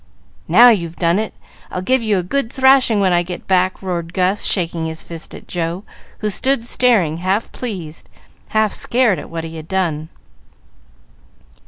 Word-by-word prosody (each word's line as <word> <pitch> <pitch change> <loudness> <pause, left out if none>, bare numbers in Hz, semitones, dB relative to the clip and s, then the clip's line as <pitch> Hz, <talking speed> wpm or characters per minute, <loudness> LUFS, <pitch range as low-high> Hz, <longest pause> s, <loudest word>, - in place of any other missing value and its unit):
"Now 230 +9 +8
you've 170 -7 0
done 170 +2 +1
it! 220 - -3 0.4
I'll 185 - -4
give 260 +5 +2
you 215 -3 +1
a 180 - -1
good 230 +6 -2
thrashing 265 -5 +4
when 190 -2 +3
I 175 - +3
get 175 0 -7
back!" 185 0 +1
roared 170 -2 -3
Gus, 190 +2 +1
shaking 170 -3 0
his 160 0 -7
fist 165 -1 -9
at - - -12
Joe, 170 +2 -3 0.4
who 210 -1 0
stood 260 +2 0
staring, 220 -11 +2
half 190 +5 -1
pleased, 180 -10 -6 0.4
half 215 -1 +1
scared, 240 -6 +1
at - - -9
what 165 -1 -5
he 165 0 -7
had 155 0 -9
done. 165 -5 -1
185 Hz, 170 wpm, -18 LUFS, 170-220 Hz, 0.4 s, Now